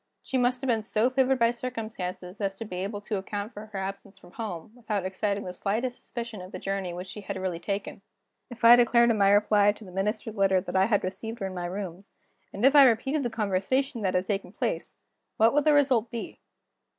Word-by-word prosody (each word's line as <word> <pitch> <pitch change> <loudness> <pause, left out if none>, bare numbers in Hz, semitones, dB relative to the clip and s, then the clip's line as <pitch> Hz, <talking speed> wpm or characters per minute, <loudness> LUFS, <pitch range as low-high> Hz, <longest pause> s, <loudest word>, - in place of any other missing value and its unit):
She - - -5
must 250 0 +2
have 270 - -3
been 230 -3 +2
so 220 +3 +1
favored 265 0 +2
by 235 -1 +3
circumstances 215 -6 -6
as 195 -1 -1
to 225 - -7
be 185 -4 -6
able 200 +3 -4
to 210 0 -3
account 205 +3 -5
for 210 +1 -9
her 210 -2 -7
absence 195 0 -6
from 175 -1 -17
home, 205 -5 -6
without 215 -5 -3
exciting 200 +2 -1
the 180 - -6
slightest 225 +7 -2
suspicion 235 -4 -6
of 185 +1 -10
the - - -6
journey 195 -2 -3
which 175 +1 -6
she 210 +3 -8
had 200 -1 -5
really 185 -3 -3
taken, 200 +2 -4 0.5
if 240 -1 -4
I 235 +1 +11
declared 235 0 +5
in 220 - 0
my 195 0 +5
reply 205 0 +4
to 215 - -13
the 185 - -11
Minister's 210 +3 -2
letter 195 -1 +4
that 180 - -6
I 190 0 +5
had 205 -1 +1
received 220 +5 -4
her 195 - -4
in 190 - -4
my 175 -1 -4
rooms, 190 0 -6 0.4
and 205 +5 -1
if 275 +2 +5
I 280 -2 +10
repeated 270 +6 0
the 245 - -1
conversation 225 +4 -1
that 190 -3 0
had 180 +1 +1
taken 195 0 -3
place, - - -3 0.4
what 225 +3 +5
would 295 0 +2
the 305 - +5
result 260 -6 +3
be? 235 - -6
210 Hz, 230 wpm, -27 LUFS, 190-235 Hz, 0.5 s, I